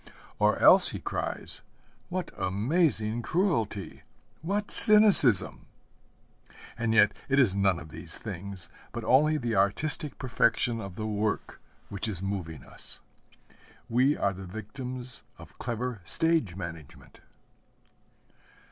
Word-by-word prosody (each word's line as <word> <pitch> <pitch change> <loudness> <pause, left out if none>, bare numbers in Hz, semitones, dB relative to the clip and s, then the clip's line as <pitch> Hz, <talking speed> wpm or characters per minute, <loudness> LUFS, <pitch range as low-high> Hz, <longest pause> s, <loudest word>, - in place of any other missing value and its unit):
Or - - +3
else - - +7
he - - -5
cries, - - -5 0.5
'What 180 -1 -4
amazing 110 - 0
cruelty, 115 - -2 0.4
what 200 +6 -3
cynicism!' 210 - +5 1.1
And 115 -1 -1
yet 105 -1 +5 0.2
it 135 +1 +3
is 110 -8 +4
none 100 -3 +2
of 75 - -11
these - - 0
things, 95 -1 -5 0.3
but - - -5
only 150 +4 +3
the 120 -5 -2
artistic 140 +10 0
perfection 120 -2 0
of 95 -2 -8
the 110 - -5
work 105 0 -3 0.3
which 100 +2 -4
is 100 -5 -4
moving 90 -7 -5
us. - - -10 0.9
We 130 +5 +2
are 100 - 0
the 95 0 -9
victims 125 +5 -4 0.2
of - - -15
clever 120 -2 -4
stage 160 - 0
management. 80 -6 -10
110 Hz, 120 wpm, -28 LUFS, 95-135 Hz, 1.1 s, else